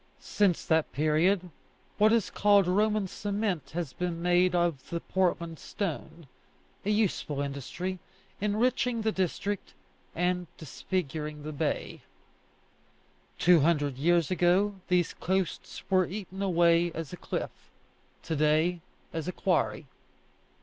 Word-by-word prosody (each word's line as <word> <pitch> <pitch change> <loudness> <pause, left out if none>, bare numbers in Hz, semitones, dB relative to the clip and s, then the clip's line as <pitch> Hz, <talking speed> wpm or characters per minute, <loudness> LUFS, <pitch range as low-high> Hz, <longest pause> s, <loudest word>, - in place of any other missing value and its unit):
Since 195 -5 +1
that 160 -1 +2
period 160 +6 +2 0.5
what 215 +1 +6
is 225 -5 +2
called 205 -1 +4
Roman 210 +2 +2
cement 200 -3 -2
has 165 -7 -3
been 175 +1 -3
made 180 +1 +3
of 170 -6 0
the 170 - -2
Portland 170 -3 -1
stone 165 -3 -5 0.6
a 200 - -2
useful 205 -9 0
industry, 145 +7 -4 0.4
enriching 230 +3 +1
the 220 - +2
district, 190 +1 -2 0.4
and 180 +1 0
disfiguring 155 -1 -4
the 155 - -5
bay. 150 0 -3 1.4
Two 175 -1 +6
hundred 145 -3 +1
years 170 +1 +2
ago 185 +3 +3
these 180 -2 +2
coasts 190 -2 -2
were 185 -2 +3
eaten 195 0 -6
away 170 -2 +3
as 165 0 -6
a - - -6
cliff; - - -4 0.7
to 160 - -2
day, 155 +4 +2 0.3
as 165 0 -3
a - - -1
quarry. 180 -4 0
175 Hz, 120 wpm, -29 LUFS, 160-195 Hz, 1.4 s, what